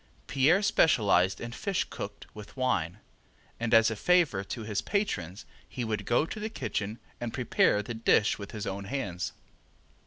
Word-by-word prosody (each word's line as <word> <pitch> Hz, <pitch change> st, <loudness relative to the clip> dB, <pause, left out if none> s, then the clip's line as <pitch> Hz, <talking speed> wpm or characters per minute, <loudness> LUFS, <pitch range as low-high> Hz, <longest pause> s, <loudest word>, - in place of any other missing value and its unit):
Pierre 160 Hz, +9 st, +3 dB
specialized 100 Hz, -, +3 dB
in 120 Hz, -, -6 dB
fish 195 Hz, -, -1 dB
cooked 100 Hz, 0 st, -7 dB
with 105 Hz, +4 st, -11 dB
wine, 95 Hz, -9 st, 0 dB, 0.6 s
and 115 Hz, -1 st, -2 dB
as 115 Hz, 0 st, +6 dB
a -, -, -2 dB
favor 165 Hz, -, +2 dB
to 110 Hz, +3 st, -6 dB
his 105 Hz, -2 st, -2 dB
patrons 110 Hz, -, -2 dB, 0.2 s
he 125 Hz, -, -4 dB
would 110 Hz, -3 st, -3 dB
go 120 Hz, +6 st, +3 dB
to 215 Hz, -, -6 dB
the 215 Hz, +1 st, -3 dB
kitchen 105 Hz, -, -3 dB, 0.2 s
and 120 Hz, -1 st, -3 dB
prepare 105 Hz, -4 st, +2 dB
the 120 Hz, -, -5 dB
dish 110 Hz, -1 st, +2 dB
with 100 Hz, -, -7 dB
his 105 Hz, -2 st, -5 dB
own 100 Hz, +1 st, -4 dB
hands. 100 Hz, -8 st, -3 dB
110 Hz, 165 wpm, -29 LUFS, 100-135 Hz, 0.6 s, as